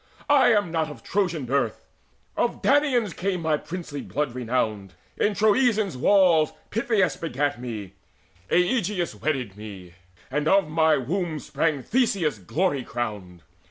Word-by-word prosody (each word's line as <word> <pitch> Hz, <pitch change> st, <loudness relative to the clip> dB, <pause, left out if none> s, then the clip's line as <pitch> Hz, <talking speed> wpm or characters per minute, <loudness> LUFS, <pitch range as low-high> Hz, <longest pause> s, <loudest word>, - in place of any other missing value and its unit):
I 280 Hz, -2 st, +6 dB
am 205 Hz, -6 st, +2 dB
not 160 Hz, -2 st, 0 dB
of 140 Hz, -6 st, -11 dB
Trojan 175 Hz, -7 st, -1 dB
birth: 135 Hz, +3 st, -1 dB, 0.5 s
of -, -, -1 dB
Danaans 265 Hz, -, +3 dB
came 185 Hz, -1 st, -2 dB
My 160 Hz, -1 st, +2 dB
princely 160 Hz, -3 st, -6 dB
blood 145 Hz, -4 st, -3 dB
renowned. 110 Hz, -6 st, -2 dB, 0.2 s
In 205 Hz, 0 st, +1 dB
Troezen's 215 Hz, -1 st, +3 dB
halls 165 Hz, +2 st, +4 dB, 0.2 s
Pittheus 215 Hz, -4 st, +1 dB
begat 145 Hz, -4 st, -2 dB
me, 105 Hz, -6 st, -6 dB, 0.6 s
Aegeus 180 Hz, -, +1 dB
wedded 125 Hz, -2 st, -2 dB
me, 100 Hz, -4 st, -10 dB, 0.4 s
And 150 Hz, +2 st, -1 dB
of 195 Hz, -1 st, +4 dB
my 160 Hz, 0 st, +3 dB
womb 160 Hz, +4 st, -2 dB
sprang 150 Hz, -2 st, -1 dB
Theseus 195 Hz, -, +1 dB
glory 140 Hz, -, -1 dB
crowned. 100 Hz, -10 st, -5 dB
155 Hz, 130 wpm, -25 LUFS, 125-195 Hz, 0.6 s, I